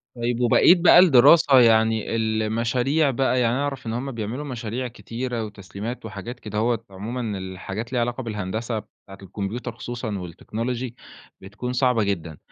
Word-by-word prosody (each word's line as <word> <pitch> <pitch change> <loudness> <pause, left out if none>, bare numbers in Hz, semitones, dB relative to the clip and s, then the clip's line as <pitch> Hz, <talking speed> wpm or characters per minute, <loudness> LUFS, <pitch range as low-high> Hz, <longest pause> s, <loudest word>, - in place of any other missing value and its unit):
طيب 120 0 -2
وبقية 125 +9 +6
بقى 175 0 +7
الدراسة، 145 -3 +7
يعني 110 -1 +3
المشاريع 115 +6 +1
بقى 130 0 +1
يعني 120 +1 +2
أعرف 140 -4 -3
إن 110 - -2
هُم 135 +3 -3
بيعملوا 115 +5 -4
مشاريع 125 -1 -4
كتيرة 120 0 -5
وتسليمات 105 +3 -7
وحاجات 110 +5 -7
كدهوّة 110 +2 -1
عمومًا 105 +2 -4
الحاجات 95 +3 -6
اللي 125 - -6
ليها - - +2
علاقة 120 +2 -2
بالهندسة، 110 +2 -3
بتاعة 95 -1 -16
الكمبيوتر 100 +6 -5
خصوصًا 120 -3 -5
والتكنولوجي، 115 +8 -5 0.5
بتكون 105 +6 -6
صعبة 125 -4 +2
جدًا، 85 -6 -3
115 Hz, 145 wpm, -23 LUFS, 105-125 Hz, 0.5 s, بقى